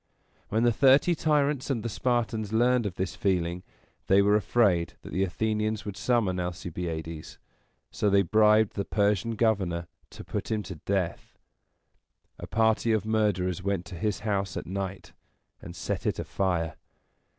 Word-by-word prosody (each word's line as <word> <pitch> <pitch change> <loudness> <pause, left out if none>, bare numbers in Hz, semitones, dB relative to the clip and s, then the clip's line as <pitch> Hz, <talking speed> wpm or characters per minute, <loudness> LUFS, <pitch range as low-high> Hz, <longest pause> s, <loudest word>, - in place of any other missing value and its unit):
When 110 +2 +1
the 120 - +4
Thirty 135 +7 +5
Tyrants 150 -4 +1
and 120 -5 -1
the - - -2
Spartans 115 -3 -1
learned 120 0 +3
of 95 - -6
this 95 0 -3
feeling, 90 -2 0 0.5
they 95 - +5
were 105 +1 +4
afraid 100 -5 +2
that - - -9
the 95 - +1
Athenians 110 +3 -1
would 100 -2 -5
summon 100 -3 +1
Alcibiades, 85 -3 -5 0.5
so 105 - 0
they 100 0 +4
bribed 110 +2 +4
the 100 - -2
Persian 105 +2 0
governor 95 -7 0 0.2
to - - -10
put - - -4
him 110 -1 -1
to 90 -5 -8
death. 95 -4 -2 1.0
A - - -7
party 110 +1 +2
of 110 -2 0
murderers 100 -5 0
went 95 -2 -2
to 90 - -9
his 105 +4 -2
house 100 -3 -1
at - - -5
night, 95 +1 -5 0.5
and 85 - -9
set - - -3
it - - 0
afire. 85 -5 -1
100 Hz, 155 wpm, -27 LUFS, 90-110 Hz, 1.0 s, Thirty